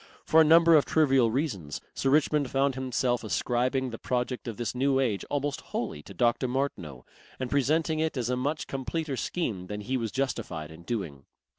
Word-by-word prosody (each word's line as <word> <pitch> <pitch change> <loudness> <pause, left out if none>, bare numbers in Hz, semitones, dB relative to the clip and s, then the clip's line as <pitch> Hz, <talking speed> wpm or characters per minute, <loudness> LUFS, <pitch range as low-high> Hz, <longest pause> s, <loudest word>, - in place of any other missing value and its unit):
For 160 - +6
a - - +8
number 165 +2 +6
of 150 - +6
trivial 135 -6 +3
reasons 110 - -2
Sir 135 - 0
Richmond 150 -1 +2
found 135 +1 +1
himself 125 -1 -1
ascribing 125 +4 0
the 115 - -7
project 125 0 -2
of 115 -3 -5
this 120 -3 -2
New 135 +1 +2
Age 115 -7 0
almost 145 0 -2
wholly 75 - -4
to 100 - -12
Dr. 120 +4 +2
Martineau, 105 - -3 0.3
and 130 -1 -4
presenting 155 +3 +1
it 160 -2 -1
as 120 -2 -1
a - - +1
much 145 +5 -2
completer 140 +2 -3
scheme 115 - -3
than 105 +1 -5
he 130 +5 -1
was 115 -3 -3
justified 115 - -3
in 80 +1 -12
doing. 85 - -4
130 Hz, 185 wpm, -28 LUFS, 115-140 Hz, 0.3 s, a